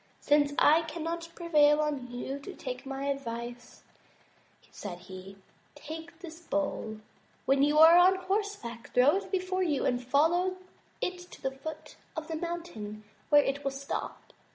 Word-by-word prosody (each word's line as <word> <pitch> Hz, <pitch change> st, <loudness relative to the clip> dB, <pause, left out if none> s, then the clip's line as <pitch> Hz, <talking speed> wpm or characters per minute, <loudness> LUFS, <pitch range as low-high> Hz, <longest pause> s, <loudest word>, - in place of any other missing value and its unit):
"Since 290 Hz, -1 st, +3 dB
I 315 Hz, +2 st, +6 dB
cannot 330 Hz, +1 st, -4 dB
prevail 300 Hz, -4 st, +4 dB
on 290 Hz, -5 st, -1 dB
you 265 Hz, +3 st, -4 dB
to 340 Hz, +7 st, -9 dB
take 255 Hz, 0 st, -6 dB
my 270 Hz, 0 st, -4 dB
advice," 240 Hz, -3 st, -5 dB, 0.9 s
said 185 Hz, -4 st, -7 dB
he, 185 Hz, +2 st, -11 dB, 0.4 s
"take 320 Hz, +3 st, -9 dB
this 330 Hz, -2 st, -9 dB
bowl. 290 Hz, -9 st, -2 dB, 0.5 s
When 270 Hz, 0 st, +3 dB
you 295 Hz, +2 st, +3 dB
are 325 Hz, +2 st, +9 dB
on 370 Hz, +2 st, +6 dB
horse 400 Hz, +2 st, -1 dB
back 235 Hz, -, -9 dB
throw 265 Hz, +8 st, +6 dB
it 395 Hz, -, -6 dB
before 370 Hz, -1 st, -1 dB
you, 310 Hz, -7 st, +1 dB
and 245 Hz, 0 st, 0 dB
follow 340 Hz, +8 st, +2 dB, 0.4 s
it 360 Hz, 0 st, -2 dB
to -, -, -13 dB
the 265 Hz, -, 0 dB
foot 310 Hz, +3 st, -8 dB, 0.2 s
of 320 Hz, +1 st, -5 dB
a -, -, -1 dB
mountain, 315 Hz, -12 st, -5 dB, 0.3 s
where 290 Hz, -1 st, +7 dB
it 280 Hz, +1 st, -2 dB
will 275 Hz, -, +1 dB
stop. 275 Hz, +1 st, -6 dB
295 Hz, 155 wpm, -30 LUFS, 265-340 Hz, 0.9 s, are